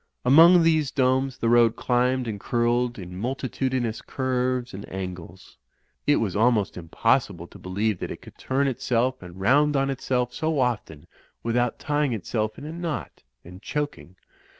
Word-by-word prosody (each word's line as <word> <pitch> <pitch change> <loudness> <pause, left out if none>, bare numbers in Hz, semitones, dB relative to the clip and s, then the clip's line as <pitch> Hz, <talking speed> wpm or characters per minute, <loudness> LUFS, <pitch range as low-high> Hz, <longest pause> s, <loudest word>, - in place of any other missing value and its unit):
Among 165 +6 +7
these 160 -4 +3
domes 130 0 +1
the 115 - -1
road 120 -1 +5
climbed 125 +1 +1
and 105 -3 -4
curled 120 +2 0
in 90 -2 -8
multitudinous 130 -1 -2
curves 130 -1 -2
and 100 +2 -9
angles. 90 -1 -8 0.5
It 145 - +5
was 105 -9 -1
almost 110 -2 +2
im 85 -2 -9
possible - - +1
to - - -15
believe 100 +2 -1
that - - -4
it - - -7
could - - -14
turn 135 +2 0
itself 125 0 0
and 90 -1 -11
rotind 145 +8 +3
on 135 0 +1
itself 125 -2 -1
so 160 -1 -1
often 120 - -2 0.4
without 120 +1 0
tying 145 -3 0
itself 110 +1 -2
in 140 - -9
a 155 - -6
knot 170 -3 -5 0.2
and 90 +2 -12
choking. 145 - -4
125 Hz, 160 wpm, -25 LUFS, 110-135 Hz, 0.5 s, Among